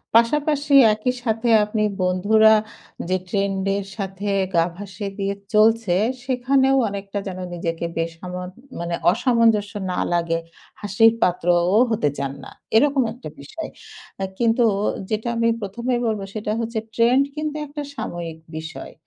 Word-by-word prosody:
পাশাপাশি 290 +4 +2 0.2
একই 235 +4 -1
সাথে 225 0 0
আপনি 215 0 -1 0.2
বন্ধুরা 210 +4 +4 0.6
যে 185 - +2
ট্রেন্ড 195 0 -1
এর 200 - -4
সাথে 195 0 -4 0.3
গা 165 0 +4
ভাসিয়ে 200 0 -6
দিয়ে 200 0 -1 0.2
চলছে 215 -3 +4 0.3
সেখানেও 265 +1 +2
অনেকটা 200 0 -5
যেন 185 -1 -5
নিজেকে 170 -1 -3
বেসামাল 180 +2 -4 0.3
মানে 170 0 -2 0.2
অসামঞ্জস্য 225 -3 +2 0.2
না 180 - -2
লাগে, 165 -1 +1 0.4
হাসির 215 +3 +4
পাত্রও 175 +2 +2
হতে 180 -10 +1
চান 140 -1 -3
না। - - -10 0.2
এরকম 275 +3 +4
একটা 195 -11 -9
বিষয়। 315 - -7 0.5
আ - - +1
কিন্তু 235 +1 +3 0.5
যেটা 220 +2 -2
আমি 230 - +2
১ম 205 +4 -6
এই - - 0
বলব 215 -2 -1
সেটা 210 -1 -3
হচ্ছে 230 -1 -2
ট্রেন্ড 245 +4 +4
কিন্তু 305 0 -3
একটা 295 +1 -6
সাময়িক 165 -6 -5 0.2
বিষয়। 160 +1 -8
205 Hz, 140 wpm, -22 LUFS, 180-230 Hz, 0.6 s, বন্ধুরা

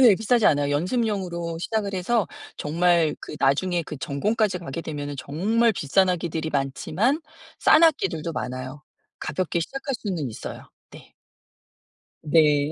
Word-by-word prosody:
예 235 -6 +8
비싸지 225 +2 +2
않아요. 145 -1 +3
연습용으로 175 - -1
시작을 200 +1 -2
해서 200 +2 +1 0.3
정말 170 +1 +2
그 - - -8
나중에 170 +6 +2
그 150 - -7
전공까지 195 - 0
가게 165 0 -6
되면은 145 -2 -5
정말 215 - +1
비싼 185 +3 +2
악기들이 160 -2 -2
많지만 155 - 0 0.4
싼 315 - +5
악기들도 315 - +2
많아요. 130 +2 -5 0.4
가볍게 175 -2 -1
시작할 270 - -4
수는 175 - -2
있어요. 110 - -8 0.2
네. - - -15 1.1
네. 150 -1 +3
170 Hz, 305 characters per minute, -24 LUFS, 150-210 Hz, 1.1 s, 예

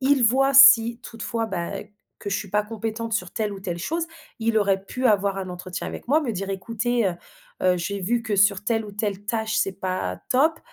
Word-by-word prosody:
il 270 -2 +3
voit 270 +4 +3
si 240 -3 +8
toutefois, 230 0 -4
bah, 190 0 -4 0.4
que 200 - -6
je 200 - +1
suis 200 - -8
pas 210 +1 +2
compétente 225 +1 -5
sur 180 -5 -1
telle 215 -3 -2
ou 195 - -8
telle 175 -2 -4
chose. 330 - -2 0.3
Il 225 -1 +1
aurait 195 -1 +1
pu 255 +5 -1
avoir 200 -2 +2
un 190 -1 -5
entretien 180 +1 -6
avec - - -8
moi, 305 +3 +4
me 240 - -2
dire: 195 0 -4
«Écoutez, 230 +3 -1
heu 180 - -1 0.5
heu, 180 -1 +3
j'ai 200 +3 -3
vu 230 +5 0
que 215 -3 -2
sur 200 0 +3
telle 225 -2 0
ou 205 - -10
telle 205 -1 -3
tâche, 220 0 -1
c'est 195 - +1
pas 185 - -2
top», 315 +5 +3
215 Hz, 220 wpm, -24 LUFS, 195-235 Hz, 0.5 s, si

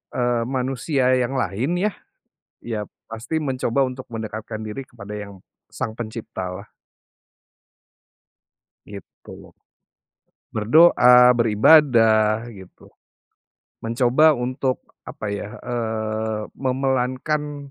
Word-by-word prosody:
eee, 120 -1 0
manusia 130 +1 0
yang 125 +2 -1
lain 125 - -1
ya, 200 +4 0 0.7
ya 115 -3 -3 0.2
pasti 115 +7 -5
mencoba 135 -2 0
untuk 130 0 -6
mendekatkan 110 -1 -6
diri 125 +5 -7
kepada 105 -3 -11
yang 100 -2 -10 0.2
Sang 110 - -4
Pencipta 110 -5 -6
lah. 95 +3 -8 2.2
Gitu. 100 -1 -13 1.3
Berdoa, 125 0 +6
beribadah, 115 -2 +4
gitu. 95 -3 -15 0.9
Mencoba 125 +6 +3
untuk, 130 +1 -2 0.2
apa - - -7
ya, 105 +2 -6
eee, 110 -2 -3 0.2
memelankan, 135 +2 -2
120 Hz, 90 wpm, -22 LUFS, 110-130 Hz, 2.2 s, Berdoa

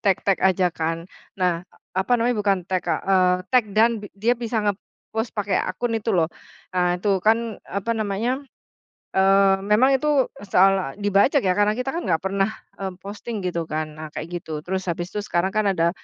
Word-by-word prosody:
take-take 195 -1 +1
aja 185 -2 +3
kan? 165 +1 -2 0.3
Nah, 180 -3 +1 0.3
apa 190 +6 0
namanya, 240 +1 +1
bukan 200 -2 +2
take 185 0 -2
eee, 185 -1 +3 0.2
take 245 -4 +4
down 230 0 +4
bi 205 - -8
dia 225 +4 +2
bisa 230 -3 -2
ngepos 220 +2 -4
pakai 205 -1 +1
akun 230 +6 -2
itu 220 - -6
loh. 165 0 +1 0.4
Nah 180 -1 +2
itu 195 0 +1
kan 225 +1 +1
apa 200 +5 -2
namanya, 225 +5 -1 0.8
eee, 195 0 +5
memang 225 +6 +4
itu 295 -3 +2 0.2
soal 190 -6 +3
dibajak 205 +8 +4
ya 185 -1 +2
karena 205 0 +4
kita 250 +3 -3
kan 345 - -2
nggak 165 -4 +1
pernah, 195 +2 0 0.3
eee, 190 -1 -3
posting 210 +2 -6
gitu 170 -2 -2
kan 155 -1 -4
nah 155 -1 -6
kayak - - -5
gitu 155 -2 -6
terus 190 +2 -3
habis 175 +1 -3
itu 210 - -3
sekarang 175 0 0
kan 215 0 +2
ada 170 -2 +2
195 Hz, 180 wpm, -23 LUFS, 180-220 Hz, 0.8 s, eee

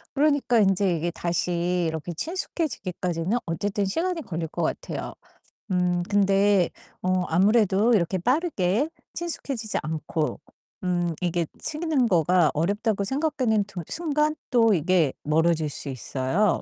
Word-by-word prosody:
그러니까 285 -4 +3
인제 195 -1 +3
이게 170 +2 -2
다시 175 +1 -1
이렇게 160 +2 -4
친숙해지기까지는 195 - -2
어쨌든 200 +4 -1
시간이 330 - -1
걸릴 165 -5 -4
것 - - -3
같아요. - - -3 0.6
음 180 -1 +1
근데 200 -2 +3 0.3
어 185 0 +1
아무래도 205 +4 +3
이렇게 185 -1 +1
빠르게 250 - +1 0.3
친숙해지지 275 -10 -2
않고 155 0 -2 0.4
음 175 -2 0
이게 175 -2 0
치는 310 -5 0
거가 175 -3 +3
어렵다고 200 +6 0
생각되는 255 -3 +1
두 195 -4 -7
순간 305 -2 0 0.2
또 225 -4 +5
이게 170 -3 +2
멀어질 160 0 +2
수 145 - -3
있어요. 135 - 0
190 Hz, 295 characters per minute, -25 LUFS, 170-235 Hz, 0.6 s, 또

